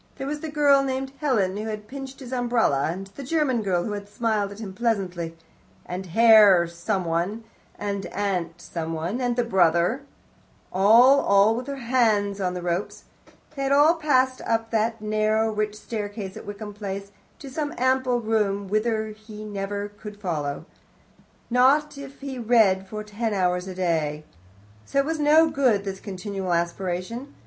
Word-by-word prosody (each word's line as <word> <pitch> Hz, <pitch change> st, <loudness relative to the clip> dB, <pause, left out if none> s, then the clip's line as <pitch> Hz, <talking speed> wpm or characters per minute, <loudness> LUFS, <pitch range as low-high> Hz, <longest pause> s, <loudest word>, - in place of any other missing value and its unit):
There 270 Hz, -, -5 dB
was 295 Hz, +2 st, -3 dB
the 315 Hz, -, -5 dB
girl 290 Hz, -2 st, +4 dB
named 265 Hz, 0 st, -2 dB
Helen, 210 Hz, -10 st, +1 dB
who 215 Hz, +1 st, -4 dB
had 215 Hz, -1 st, -5 dB
pinched 270 Hz, +1 st, -8 dB
his 260 Hz, -1 st, -7 dB
umbrella, 235 Hz, -, +1 dB
and 190 Hz, +3 st, -6 dB
the 195 Hz, +8 st, -11 dB
German 275 Hz, -4 st, +1 dB
girl 180 Hz, -4 st, 0 dB
who 215 Hz, -, -4 dB
had 205 Hz, 0 st, -6 dB
smiled 210 Hz, -2 st, -1 dB
at 200 Hz, -, -9 dB
him 210 Hz, -4 st, -7 dB
pleasantly, 185 Hz, -7 st, -2 dB, 0.5 s
and 185 Hz, +1 st, -5 dB
Herr 210 Hz, -2 st, +7 dB
someone, 175 Hz, +3 st, -2 dB, 0.3 s
and 200 Hz, -2 st, -3 dB
Aunt 180 Hz, -4 st, -2 dB
someone, 165 Hz, +7 st, -4 dB
and 245 Hz, -1 st, 0 dB
the 245 Hz, -, +1 dB
brother 180 Hz, +2 st, +2 dB, 0.7 s
all, 230 Hz, +9 st, +6 dB
all 200 Hz, -1 st, +4 dB
with 250 Hz, +3 st, -5 dB
their 280 Hz, -, -3 dB
hands 220 Hz, -6 st, +1 dB
on 180 Hz, -1 st, -1 dB
the 180 Hz, -, -5 dB
ropes. 175 Hz, +2 st, -3 dB, 0.5 s
They 275 Hz, -, -4 dB
had 275 Hz, 0 st, 0 dB
all 295 Hz, +4 st, +6 dB
passed 260 Hz, -6 st, +1 dB
up 225 Hz, 0 st, 0 dB
that 225 Hz, 0 st, 0 dB
narrow, 215 Hz, +1 st, +1 dB
rich 210 Hz, 0 st, -1 dB
staircase 205 Hz, -2 st, -5 dB
at -, -, -10 dB
Wickham 205 Hz, 0 st, -7 dB
Place, 200 Hz, -1 st, -6 dB, 0.3 s
to 280 Hz, -, -10 dB
some 290 Hz, +2 st, -3 dB
ample 255 Hz, -1 st, +1 dB
room, 210 Hz, -3 st, 0 dB
whither 220 Hz, +1 st, 0 dB
he 215 Hz, 0 st, -10 dB
could 210 Hz, -1 st, -8 dB
never 200 Hz, +1 st, -4 dB, 0.3 s
follow 155 Hz, -7 st, -2 dB
them, -, -, -11 dB, 0.9 s
not 275 Hz, +5 st, +4 dB
if 275 Hz, 0 st, -10 dB
he 270 Hz, -2 st, -5 dB
read 215 Hz, -5 st, +3 dB
for 215 Hz, +2 st, -6 dB
ten 210 Hz, +1 st, -3 dB
hours 180 Hz, -1 st, 0 dB
a 185 Hz, -, -6 dB
day. 160 Hz, -4 st, -1 dB, 0.7 s
Oh, -, -, +3 dB
it 275 Hz, -, +4 dB
was 320 Hz, +1 st, -2 dB
not 310 Hz, +2 st, +5 dB
good, 245 Hz, -8 st, +2 dB
this 195 Hz, -1 st, -5 dB
continual 195 Hz, -2 st, -4 dB
aspiration. 180 Hz, +9 st, -3 dB
215 Hz, 170 wpm, -24 LUFS, 190-250 Hz, 0.9 s, Herr